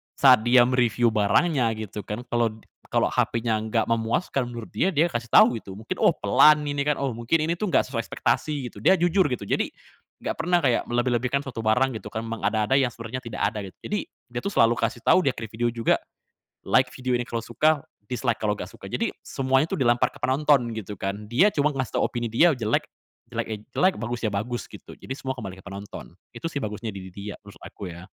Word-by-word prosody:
saat 130 -3 +7
dia 120 0 +6
me-review 120 -2 +2
barangnya 115 - +2
gitu 105 -1 -6
kan, 105 +4 -5
kalau 120 -1 +3 0.4
kalau - - +2
HP-nya 115 -1 0
enggak 110 +1 0
memuaskan 115 +3 0
menurut 120 -2 -7
dia 190 - +2
dia 165 -3 +3
kasih 120 -1 -4
tahu 120 - +7
gitu 95 - -10
mungkin 110 - -5
oh - - +6
"pelan" 150 0 +5
ini 145 -1 -1
kan, 150 - +3
oh 135 -2 -1
mungkin 120 +8 +1
ini - - +3
tuh 215 - -1
"enggak - - +3
sesuai - - -1
ekspektasi," 145 -4 -1
gitu - - -16
dia 190 - +6
jujur 175 +2 +3
gitu. 125 - -2
Jadi, - - 0 0.5
enggak - - -2
pernah 175 +2 +2
kayak 125 -4 +2
melebih-lebihkan 120 +2 +1
suatu 125 -4 -5
barang 125 +2 +2
gitu - - -10
kan 110 0 -4
memang 115 0 -5
ada-ada 110 +4 +2
yang 130 -2 +2
sebenarnya 115 +2 -6
tidak 115 -2 -6
ada 105 - 0
gitu. 95 - -15
Jadi, 210 -1 -1 0.3
dia 120 - -3
tuh 200 - -3
selalu 115 +1 +4
kasih 115 +1 -1
tahu - - +6
di - - +4
akhir 115 - -6
video 120 +2 -1
juga, 115 -1 +2 0.7
"Like 130 -1 +3
video 130 -1 -2
ini 120 - -3
kalau 115 -1 -3
suka 145 +6 +1 0.2
dislike 120 -1 -1
kalau 105 - +1
enggak - - -6
suka," - - -11
jadi - - -1
semuanya 135 +2 +1
tuh - - -1
dilempar 120 -2 +3
ke - - -16
penonton 135 -1 +3
gitu 105 -1 -6
kan, 100 +2 -4
dia 145 - +5
cuma 150 +1 +2
ngasih 130 -3 -2
tau - - +2
opini 120 -1 -3
dia 165 +10 +5
jelek 115 -3 0 0.5
jelek - - -2
ya 110 - -3 0.2
jelek, 185 +1 +4
bagus 120 +1 -3
ya - - -2
bagus 120 +5 -3
gitu. - - -12
Jadi, 135 - -6
semua 130 - -4
kembali 100 -6 -7
ke - - -16
penonton. 100 -2 -8 0.2
Itu - - -8
sih 140 - -2
bagusnya 105 +1 -4
diri 95 -1 -8
dia, 100 +3 -7
terus 100 -1 -14
aku 100 - -8
ya. 85 +1 -10
120 Hz, 220 wpm, -25 LUFS, 110-135 Hz, 0.7 s, saat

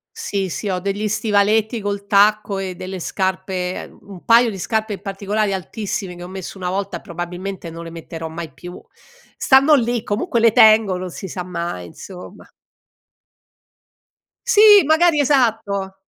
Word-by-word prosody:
Sì, 195 -2 -3
sì 205 - -4
ho 185 - -1
degli 200 +3 -2
stivaletti 215 +1 +1
col 200 0 -4
tacco 205 0 +3
e 190 -1 -4
delle 185 +1 -7
scarpe, 185 0 -2
ehm, - - -13
un 195 -3 -13
paio 235 0 +5
di 195 - -8
scarpe 220 +2 -2
in 190 - -8
particolari 200 +1 -2
altissime, 190 0 -5
che 175 - -12
ho 175 - -7
messo 190 +1 -8
una 180 -1 -3
volta 195 -1 -3
e - - -15
probabilmente 175 +1 -6
non 165 +1 -8
le 165 - -8
metterò 165 0 -8
mai 160 0 -7
più. 175 0 -10 0.6
Stanno 275 +3 +4
lì 240 -3 +1
comunque 235 - -1
le 230 0 +5
tengo 215 -3 +5
non 185 0 -5
si 190 - -8
sa 180 0 -5
mai, 170 - -5
insomma. 180 - -12 2.0
Sì, 420 -4 +7
magari 315 0 +3
esatto! 220 -8 0
195 Hz, 160 wpm, -20 LUFS, 180-220 Hz, 2.0 s, Sì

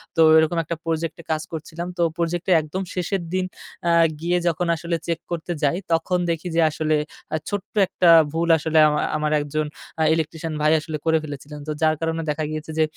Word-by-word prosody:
তো 165 - +3 0.2
এরকম 160 +2 +3
১ 160 - -10
টা - - +1
প্রজেক্টে 165 +1 -2
কাজ 155 -1 0
করছিলাম। 165 +2 -6
তো - - 0 0.2
প্রজেক্টে, 175 +2 -1
একদম 155 +5 -4
শেষের 180 +1 -1
দিন 185 0 +1 0.4
আ - - +4 0.3
গিয়ে 175 +1 +1
যখন 170 +1 0
আসলে 170 +1 -2
চেক 170 -1 -1
করতে 170 +1 -3
যাই, 145 +5 +2 0.2
তখন 165 +2 +1
দেখি 165 +1 -2
যে 170 - +4
আসলে 155 0 0 0.4
আ - - +2
ছোট্ট 205 -1 -5
একটা 175 -2 +2 0.2
ভুল 165 +1 0
আসলে 160 +1 -1
আমার, 150 0 +1
আমার 150 0 -1
১ 145 - -3
জন 155 - +1 0.4
আ - - +4
ইলেকট্রিশিয়ান 160 0 -3
ভাই 155 0 +4
আসলে 155 0 -5
করে 160 0 +4
ফেলেছিলেন। 145 0 -8
তো - - -1
যার 155 0 +3
কারণে 165 0 -1
দেখা 150 +1 -1
গিয়েছে 155 0 -5
যে, - - +6
160 Hz, 205 wpm, -23 LUFS, 155-170 Hz, 0.4 s, যে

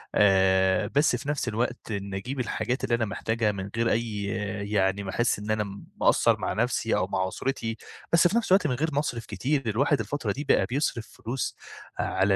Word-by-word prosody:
آآ، 95 -1 +4
بس 145 -2 +4
في 130 +4 -5
نفس 145 -4 -1
الوقت 120 +1 -2
إني 100 -2 -3
أجيب 130 +7 -5
الحاجات 125 +1 -2
اللي 120 - +2
أنا 115 -1 0
محتاجها 110 +1 0
من 100 -1 -5
غير 115 0 +1
أي 110 -2 -1 0.5
يعني 100 -1 +1
ما 95 - -5
أحس 120 0 +1
إن 105 +1 -3
أنا 110 0 +1 0.4
مقصّر - - +4
مع - - -1
نَفسي - - +1
أو - - +1
مع 95 -1 0
أسرتي، 115 +1 -3 0.4
بس 170 +1 +6
في 205 - +1
نفس 230 -5 -1
الوقت 190 -4 +5
من 130 - 0
غير 155 +5 0
ما 140 - +2
اصرف 120 -6 -3
كتير، 140 +4 -1
الواحد 135 +6 +2
الفترة 115 0 -2
دي 140 +8 -4
بقى - - +3
بيصرف 125 -3 -1
فلوس 125 +3 -4 0.4
على 95 +1 +2
115 Hz, 200 wpm, -27 LUFS, 100-135 Hz, 0.5 s, بس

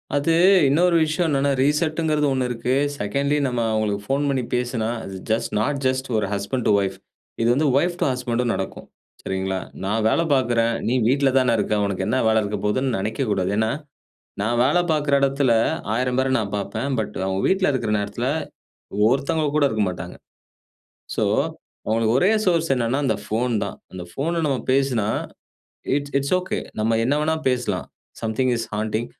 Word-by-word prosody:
அது 145 +3 +2 0.3
இன்னொரு 170 +5 +3
விஷயம் 155 +3 0
என்னன்னா, 140 -1 +1
ரீசெட்ன்கிறது 150 +1 +1
ஒண்ணு 125 -1 -1 0.2
செகண்ட்லி 140 +8 0
நம்ம 125 -2 -1
அவங்களுக்கு 105 -2 0
போன் 140 +2 +1
பண்ணி 135 -2 0
பேசினா, 125 -2 -1 0.2
அது 95 - -7
ஜஸ்ட் 110 +1 0
நாட் 140 +6 0
ஜஸ்ட் 130 +1 0
ஒரு 105 - +1
ஹஸ்பண்ட் 100 +5 -2
அன்ட் 100 - +5
வைப் 95 -1 -1 0.5
இது 115 - +2
வந்து 150 +4 +2
வைப் 175 +5 +1
டூ - - +3
ஹஸ்க்மண்ட்டும் 125 -2 -1
நடக்கும். 95 - -5 0.4
சரிங்களா? 95 0 -2 0.3
நான் 110 +3 0
வேலை 165 - +2
பார்க்றேன், 120 -3 +2 0.2
நீ 120 - +1
வீட்ல 135 +2 +3
தானே 125 -2 +2
இருக்க. 105 - 0
உனக்கு 100 -2 -2
என்ன 120 +4 +1
வேலை 110 0 +4
இருக்க 105 +1 -3
போதுன்னு 130 +6 +1
நெனைக்க 110 +7 -2
கூடாது. 95 -1 0
ஏன்னா, 110 0 +2 0.7
நான் 120 +3 0
வேலை 175 +7 +3
பார்க்குற 145 -2 +2
இடத்துல 135 -2 +2 0.4
1000 125 +2 0
பேரை 130 0 +1
நான் 105 -2 -4
பார்ப்பேன். 115 +6 -3
பட் 105 -1 -4
அவங்க 95 0 -1
வீட்ல 190 -2 +2
இருக்குற 120 -5 -1
நேரத்துல 105 +5 -3 0.8
ஒருத்தவங்க 145 +3 0
கூட 150 - +3
இருக்க 110 -3 0
மாட்டாங்க. 90 0 -7 1.0
சோ - - 0 0.6
அவங்களுக்கு 110 +1 +2
ஒரே 185 +8 +4 0.2
சோர்ஸ் 165 -3 +2
என்னென்னா, 120 +2 0
அந்த 135 - +1
ஃபோன் 120 +3 -1
தான். 100 - -6 0.2
அந்த 95 -1 -7
ஃபோன்ன 165 - -1
நம்ம 135 -3 0
பேசுனா, 130 -6 +1 0.9
இட்ஸ் 145 0 -4
இட்ஸ் 140 +5 0
ஒகே 185 - -3 0.2
நம்ம 110 +1 +2
என்ன 135 - +2
வேணாலும் 160 0 -1
பேசலாம். 120 -7 -2 0.4
Something 115 +3 0
is 115 - -3
haunting 110 +2 -2
125 Hz, 165 wpm, -22 LUFS, 110-140 Hz, 1.0 s, அன்ட்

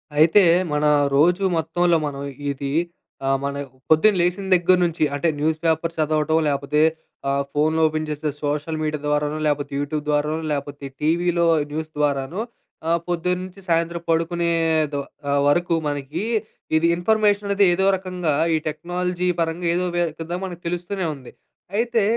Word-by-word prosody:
అయితే 165 +7 +6 0.3
మన 150 0 +1 0.3
రోజు 175 +7 +4
మొత్తంలో 170 +1 +2
మనం 140 -1 -6 0.3
ఇది 140 0 -4 0.6
ఆహ్, 135 - +3
మన 140 0 -2 0.3
పొద్దున 160 +7 +5
లేసిన 180 +3 0
దగ్గర 180 +1 +4
నుంచి 170 -2 0
అంటే 145 +4 0
న్యూస్ 155 +1 +1
పేపర్ 165 +1 +1
చదవటం 155 0 +1
లేపోతే 140 +1 0 0.5
ఆహ్, 140 0 +1
ఫోన్లు 155 +2 +1
ఓపెన్ 155 0 -3
చేస్తే 150 0 -2
సోషల్ 150 +2 -2
మీడియా 150 -1 -2
ద్వారానో 150 +1 0
లేపోతే 145 -1 -1
యూట్యూబ్ 145 +1 -2
ద్వారానో 150 +1 +1
లేపోతే 140 0 -4 0.2
టీవీలో 170 +2 +2 0.3
న్యూస్ 155 +1 -4
ద్వారానో 145 +5 0 0.5
ఆహ్, 170 +1 +2
పొద్దున్నుంచి 180 +2 -2
సాయంత్రం 170 0 0
పడుకునేదో 165 -3 +1 0.3
ఆహ్, 140 0 +2
వరకు 170 +3 +2
మనకీ 145 +4 -3 0.5
ఇది 165 +1 +2
ఇన్‌ఫర్‌మేషననేది 205 0 +2
ఏదోక 190 +2 +3
రకంగా 180 -4 -2 0.2
ఈ - - +3
టెక్నాలజీ 180 +3 -2
పరంగా 165 +1 -1
ఏదో 180 +1 0
వే 175 - +2 0.2
కింద 165 +1 -6
మనకు 175 -2 -8
తెలుస్తూనే 175 +2 -3
ఉంది. 130 -3 -13 0.5
అయితే 230 -1 +1
160 Hz, 140 wpm, -22 LUFS, 150-175 Hz, 0.6 s, అయితే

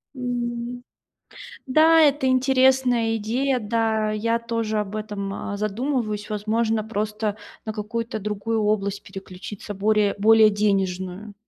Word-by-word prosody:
М, 245 -1 -4 0.8
да, 315 +4 +5
это 290 -2 +3
интересная 255 -3 +3
идея. 250 +5 0
Да, 220 -1 0
я 230 +2 0
тоже 230 -2 -2
об 210 0 -3
этом, 205 -2 -4
а, 205 0 -5
задумываюсь. 215 0 -2
Возможно, 215 +1 0
просто 215 -1 -2 0.3
на 220 - -3
какую-то 225 +2 -4
другую 210 +2 -2
область 200 -1 0
переключиться 195 +2 -8
более, 210 0 +2
более 220 +1 +6
денежную. 195 -1 -1
220 Hz, 115 wpm, -23 LUFS, 210-240 Hz, 0.8 s, более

